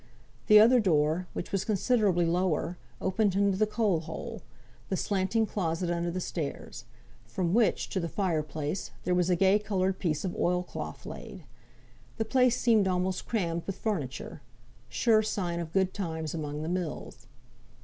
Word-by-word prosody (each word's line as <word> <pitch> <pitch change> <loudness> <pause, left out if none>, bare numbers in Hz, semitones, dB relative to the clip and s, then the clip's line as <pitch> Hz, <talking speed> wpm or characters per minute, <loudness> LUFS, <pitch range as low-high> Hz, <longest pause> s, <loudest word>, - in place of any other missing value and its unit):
The 210 0 +9
other 240 +4 +7
door, 165 -2 +2
which - - -5
was 195 -1 0
considerably 205 -4 +2
lower, 175 0 0 0.2
opened 190 +1 +1
into 200 -1 +3
the 215 +2 +2
coal 210 -5 +1
hole 170 +8 -7 0.5
the 190 - 0
slanting 200 +4 +1
closet 175 -4 -2
under 170 0 -1
the 180 +2 -3
stairs; 150 -7 -5 0.4
from 170 +9 -1
which, 220 -5 +2
to 190 - -1
the 170 -2 -3
fire 180 -6 0
place, 150 +4 -4
there 180 - +1
was 180 0 +2
a 180 - +4
gay 195 +3 +4
coloured 190 -3 -1
piece 160 -1 -1
of 180 - -3
oil 180 0 +1
cloth - - -7
laid. - - -8 0.7
The 225 - -1
place 250 +1 +3
seemed 220 -5 +4
almost 185 0 -1
crammed 170 -7 -1
with 195 - -4
furniture 160 - -4 0.5
(sure 215 - +3
sign 180 -5 -2
of 165 -2 -5
good 190 +1 +1
times 160 -5 -4
among 150 -2 -4
the - - -4
mills). 175 -3 -4
185 Hz, 165 wpm, -29 LUFS, 170-205 Hz, 0.7 s, The